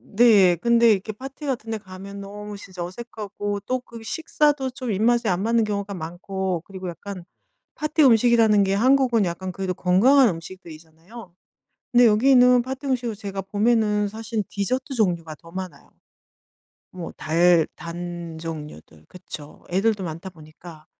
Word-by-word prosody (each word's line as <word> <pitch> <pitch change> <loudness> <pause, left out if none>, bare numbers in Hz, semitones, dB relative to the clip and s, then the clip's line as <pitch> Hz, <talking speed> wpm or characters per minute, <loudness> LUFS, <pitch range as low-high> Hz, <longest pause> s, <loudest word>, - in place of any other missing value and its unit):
네. 205 -6 +6
근데 235 +3 +4
이렇게 205 +1 0
파티 270 +7 -9
같은 240 -5 -3
데 220 - -1
가면 195 0 -10
너무 205 +1 -8
진짜 185 -3 -8
어색하고 205 +1 -5
또 255 +5 -2
그 230 -2 -12
식사도 295 +2 0
좀 250 -1 -5
입맛에 230 +4 +2
안 180 0 0
맞는 230 0 +2
경우가 200 -1 -3
많고 185 +1 -4
그리고 190 -2 -7
약간 180 +1 -8 0.5
파티 305 +1 +1
음식이라는 230 -3 +5
게 195 0 0
한국은 245 0 +3
약간 185 +1 -4
그래도 185 0 -3
건강한 235 +10 +4
음식들이잖아요. 170 +3 -10 0.6
근데 245 0 +6
여기는 250 +2 +5
파티 265 +2 -6
음식을 245 -4 -1
제가 195 -1 -5
보면은 210 +1 +1
사실 220 +1 -4
디저트 255 +8 -2
종류가 170 -8 0
더 165 +2 -16
많아요. 185 -5 -8 1.0
뭐 180 -2 -7
달 170 +1 +3
단 170 -1 -7
종류들. 150 - -9
그쵸. 155 -4 -11
애들도 200 +2 +1
많다 165 +2 -6
보니까. 155 -1 -14
200 Hz, 320 characters per minute, -23 LUFS, 175-235 Hz, 1.0 s, 네